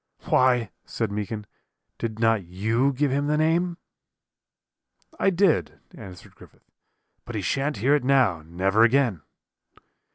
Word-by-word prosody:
"'Why,' 125 -4 +3
said 115 -3 -4
Meekin, 105 +1 -4 0.5
'did 110 -2 -4
not 115 -3 +2
you 110 +10 0
give 140 +1 0
him 140 +2 0
the 150 0 +1
name?' 170 +3 +1 1.4
"'I - - +3
did,' 190 -2 +1
answered 90 -2 -12
Griffith; - - -19 0.6
'but 120 - -8
he 105 - -2
shan't 135 - -1
hear 130 +8 +2
it 150 - +2
now, 125 - +2
never 95 +7 0
again.' 120 - +3
120 Hz, 130 wpm, -24 LUFS, 105-140 Hz, 1.4 s, Why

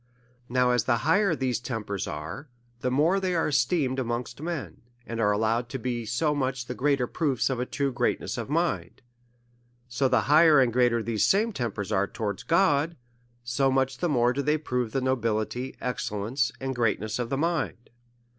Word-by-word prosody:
Now, 125 0 +3
as 125 -3 +1
the 120 -2 +2
higher 185 +2 +3
these 130 -4 -1
tempers 110 -6 -4
are, 80 - -6 0.3
the 125 - -1
more 155 +9 +3
are - - +1
they 185 -2 -1
esteemed 140 -3 +1
amongst 120 +1 -3
men, 165 -3 -5 0.2
and 115 0 -5
are 105 -2 +3
allow 110 +2 +1
ed 120 -1 -8
to 135 - -4
be 120 -2 -3
so 150 +7 +1
much 130 -3 -2
the 125 - -5
greater 135 0 +1
proofs 135 -1 0
of 125 - -2
a 125 - -2
true 140 -2 -1
great - - +1
ness - - -5
of - - -5
mind; 130 - -1 0.8
so 125 +2 +1
the 130 -3 +3
higher 150 +4 +6
and 125 -3 +3
greater 120 -2 +3
these 110 -2 +1 0.2
tempers 110 - -3
are 100 -1 +2
towards 100 -2 -4
God, 165 -2 +2 0.5
so 120 +3 +1
much 130 0 0
tiic 175 - 0
more 125 -3 +3
do 140 - -1
they 150 +2 +1
prove 125 -6 -2
the. 135 - -1
nobility, 120 0 -1
excellence, 125 +1 -2
and 135 0 -3
greatness 110 -1 0
of 120 -1 -2
the 135 - -1
mind. 160 -6 -2
125 Hz, 185 wpm, -27 LUFS, 115-140 Hz, 0.8 s, higher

